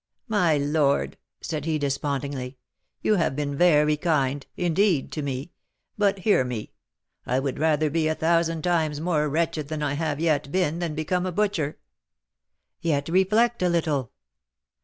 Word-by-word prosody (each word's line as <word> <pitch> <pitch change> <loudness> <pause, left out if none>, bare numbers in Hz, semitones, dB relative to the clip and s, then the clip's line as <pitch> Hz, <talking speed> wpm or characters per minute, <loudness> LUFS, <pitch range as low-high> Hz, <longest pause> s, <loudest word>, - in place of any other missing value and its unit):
"My 180 -9 +2
lord," 145 0 +1 0.3
said 155 -3 -4
he, 160 -1 0
despondingly, 140 -2 -3 0.5
"you 215 - +3
have 165 -6 +1
been 145 -1 -2
very 150 -2 +4
kind, 145 -4 0
indeed, 175 -2 +1
to 155 - -3
me; 140 +3 -4 0.4
but, 205 -1 +2
hear 190 -7 +3
me: 125 -4 -5 0.5
I 125 - +1
would 135 -1 -3
rather 155 -1 +2
be 160 0 +1
a 155 - 0
thousand 165 -1 +1
times 160 -4 +1
more 155 -2 0
wretched 160 -1 -1
than 155 0 -3
I 145 -1 0
have 150 -1 -2
yet 150 -4 0
been 170 -2 0
than 165 -3 -3
become 180 +4 -1
a - - -2
butcher." 175 -6 -1 1.0
"Yet 145 -3 0
reflect 210 +7 +2
a 180 - +3
little." 155 -7 0
155 Hz, 155 wpm, -25 LUFS, 145-170 Hz, 1.0 s, very